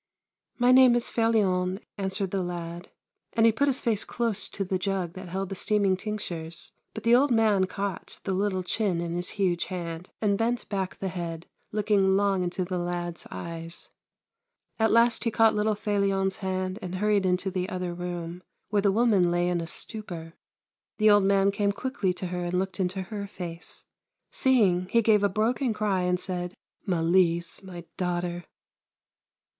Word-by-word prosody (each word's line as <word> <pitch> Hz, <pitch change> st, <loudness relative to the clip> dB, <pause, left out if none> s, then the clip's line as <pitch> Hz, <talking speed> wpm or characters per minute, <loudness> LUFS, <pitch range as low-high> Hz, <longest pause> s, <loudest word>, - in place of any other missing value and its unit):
]\Iy 245 Hz, +1 st, +5 dB
name 255 Hz, -2 st, +7 dB
is 240 Hz, -, 0 dB
Felion," 195 Hz, -5 st, +2 dB, 0.2 s
answered 190 Hz, -1 st, -2 dB
the 195 Hz, -, 0 dB
lad, 175 Hz, 0 st, -5 dB, 0.4 s
and 225 Hz, 0 st, +4 dB
he 230 Hz, -, +7 dB
put 280 Hz, +6 st, +1 dB
his 270 Hz, -2 st, +1 dB
face 225 Hz, -4 st, 0 dB
close 225 Hz, -4 st, -1 dB
to 200 Hz, -, -3 dB
the 185 Hz, 0 st, -1 dB
jug 185 Hz, -3 st, -2 dB
that 185 Hz, -1 st, -8 dB
held 190 Hz, +1 st, -3 dB
the 195 Hz, -, -4 dB
steaming 200 Hz, -1 st, +2 dB
tinc 210 Hz, +2 st, -4 dB
tures, 165 Hz, -1 st, -6 dB, 0.2 s
but 220 Hz, -, -6 dB
the 230 Hz, +1 st, +4 dB
old 280 Hz, +4 st, +4 dB
man 215 Hz, -5 st, +3 dB
caught 195 Hz, -1 st, -5 dB
the 195 Hz, -, -1 dB
little 190 Hz, -1 st, 0 dB
chin 185 Hz, -1 st, 0 dB
in 170 Hz, 0 st, -3 dB
his 175 Hz, +1 st, -2 dB
huge 180 Hz, -4 st, +1 dB
hand 170 Hz, -1 st, -5 dB
and 200 Hz, -2 st, +1 dB
bent 235 Hz, +1 st, 0 dB
back 195 Hz, -2 st, -2 dB
the 190 Hz, -, -3 dB
head, 170 Hz, -2 st, -5 dB, 0.3 s
looking 205 Hz, -2 st, +3 dB
long 200 Hz, -2 st, +2 dB
into 180 Hz, +1 st, -2 dB
the 180 Hz, 0 st, -2 dB
lad's 175 Hz, -1 st, -4 dB
eyes. 165 Hz, 0 st, -7 dB, 0.9 s
At 220 Hz, 0 st, +4 dB
last 230 Hz, +1 st, +4 dB
he 230 Hz, -, +2 dB
caught 225 Hz, 0 st, +4 dB
little 210 Hz, 0 st, +1 dB
Felion's 200 Hz, -2 st, 0 dB
hand 185 Hz, 0 st, -2 dB
and 180 Hz, 0 st, -5 dB
hurried 205 Hz, +1 st, +2 dB
into 185 Hz, +1 st, +1 dB
the 185 Hz, 0 st, -2 dB
other 180 Hz, -3 st, -3 dB
room, 175 Hz, 0 st, -5 dB, 0.3 s
where 205 Hz, 0 st, +2 dB
the 200 Hz, -1 st, +3 dB
woman 205 Hz, -5 st, +3 dB
lay 175 Hz, 0 st, +1 dB
in 175 Hz, -1 st, 0 dB
a 165 Hz, -, -5 dB
stupor. 170 Hz, -5 st, -6 dB, 0.6 s
The 215 Hz, -1 st, +5 dB
old 205 Hz, -1 st, +5 dB
man 195 Hz, 0 st, +4 dB
came 200 Hz, 0 st, +1 dB
quickly 215 Hz, -3 st, -1 dB
to 180 Hz, -, -5 dB
her 180 Hz, 0 st, -3 dB
and 175 Hz, +1 st, -2 dB
looked 190 Hz, 0 st, -2 dB
into 185 Hz, +1 st, -1 dB
her 200 Hz, +1 st, -5 dB
face. 175 Hz, -3 st, -8 dB, 0.5 s
Seeing, 195 Hz, -9 st, +3 dB
he 230 Hz, +4 st, +3 dB
gave 210 Hz, -2 st, +4 dB
a 205 Hz, -, +4 dB
broken 225 Hz, +4 st, 0 dB
cry 205 Hz, -3 st, +1 dB
and 180 Hz, 0 st, +1 dB
said: 180 Hz, -1 st, -4 dB, 0.2 s
" -, -, -43 dB
Malise, 170 Hz, 0 st, +2 dB
my 180 Hz, -3 st, -9 dB
daughter 175 Hz, -1 st, -2 dB
190 Hz, 180 wpm, -27 LUFS, 180-210 Hz, 0.9 s, name